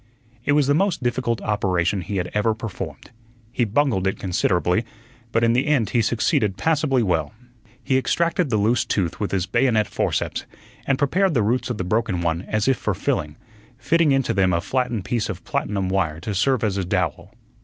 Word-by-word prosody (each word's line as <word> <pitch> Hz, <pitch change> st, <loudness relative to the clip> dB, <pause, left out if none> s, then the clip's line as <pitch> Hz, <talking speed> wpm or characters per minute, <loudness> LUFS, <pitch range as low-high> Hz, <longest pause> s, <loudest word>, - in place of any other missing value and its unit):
It 145 Hz, -, +3 dB
was 145 Hz, -1 st, +4 dB
the 145 Hz, -, +3 dB
most 175 Hz, -3 st, +1 dB
difficult 120 Hz, -1 st, -1 dB
operation 95 Hz, -3 st, 0 dB
he 100 Hz, +4 st, -4 dB
had 90 Hz, -1 st, -2 dB
ever 110 Hz, +1 st, +1 dB
performed. 115 Hz, 0 st, -7 dB, 0.4 s
He 120 Hz, -, +1 dB
bungled 110 Hz, -4 st, +1 dB
it 95 Hz, -, -1 dB
considerably, 90 Hz, +1 st, +1 dB, 0.5 s
but 115 Hz, 0 st, +1 dB
in 115 Hz, 0 st, +4 dB
the 125 Hz, +5 st, +1 dB
end 135 Hz, -8 st, +2 dB
he 120 Hz, -, +3 dB
succeeded 105 Hz, -3 st, +1 dB
passably 150 Hz, -6 st, +1 dB
well. 90 Hz, -1 st, 0 dB, 0.5 s
He 130 Hz, -1 st, +2 dB
extracted 170 Hz, +3 st, 0 dB
the 110 Hz, -, +1 dB
loose 110 Hz, +4 st, +2 dB
tooth 90 Hz, -5 st, -1 dB
with 105 Hz, -, -1 dB
his 95 Hz, -2 st, 0 dB
bayonet 110 Hz, -1 st, +2 dB
forceps -, -, -2 dB, 0.4 s
and 135 Hz, -, +2 dB
prepared 170 Hz, +5 st, +1 dB
the 115 Hz, -, +3 dB
roots 120 Hz, +3 st, 0 dB
of 120 Hz, -, -2 dB
the 95 Hz, -, -2 dB
broken 105 Hz, -1 st, 0 dB
one 85 Hz, 0 st, 0 dB
as 110 Hz, +1 st, 0 dB
if 135 Hz, -2 st, +3 dB
for -, -, -2 dB
filling, 75 Hz, 0 st, -2 dB, 0.4 s
fitting 160 Hz, +4 st, +2 dB
into 135 Hz, -1 st, +1 dB
them 95 Hz, -2 st, +2 dB
a 85 Hz, -, +1 dB
flattened 120 Hz, -3 st, -1 dB
piece 120 Hz, -3 st, -1 dB
of -, -, -6 dB
platinum 100 Hz, -2 st, -2 dB
wire 90 Hz, -5 st, 0 dB
to 105 Hz, +3 st, -3 dB
serve 120 Hz, +5 st, +1 dB
as 100 Hz, -3 st, 0 dB
a 95 Hz, -, 0 dB
dowel. 90 Hz, 0 st, -2 dB
110 Hz, 195 wpm, -22 LUFS, 95-130 Hz, 0.5 s, was